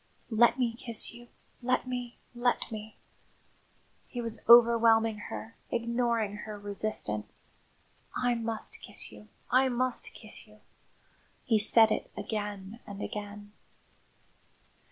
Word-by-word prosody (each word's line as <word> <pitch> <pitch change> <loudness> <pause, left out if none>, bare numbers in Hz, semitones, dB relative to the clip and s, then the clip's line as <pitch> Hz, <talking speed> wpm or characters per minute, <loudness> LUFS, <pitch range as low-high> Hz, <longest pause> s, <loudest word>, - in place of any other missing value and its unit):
"Let 235 +3 +5
me 240 -3 0
kiss 230 -1 0
you 240 0 -13 0.3
let 255 +1 0
me, 245 -1 -5 0.2
let 245 0 0
me!" 215 0 -8 1.1
He 245 - -6
was 230 -1 -3
overwhelming 230 -2 +6
her, 225 - -7
ignoring 235 -3 0
her 210 0 -7
resistance. 200 - -4 0.6
"I 245 -1 +1
must 230 -1 -3
kiss - - -4
you, 210 - -14 0.2
I 260 +1 +4
must 255 0 -1
kiss 215 0 -4
you." 215 0 -20 0.8
He 225 -5 +3
said 220 +1 +7
it - - -2
again 205 0 -5
and 200 -1 -8
again. 205 0 -6
225 Hz, 115 wpm, -30 LUFS, 210-240 Hz, 1.1 s, said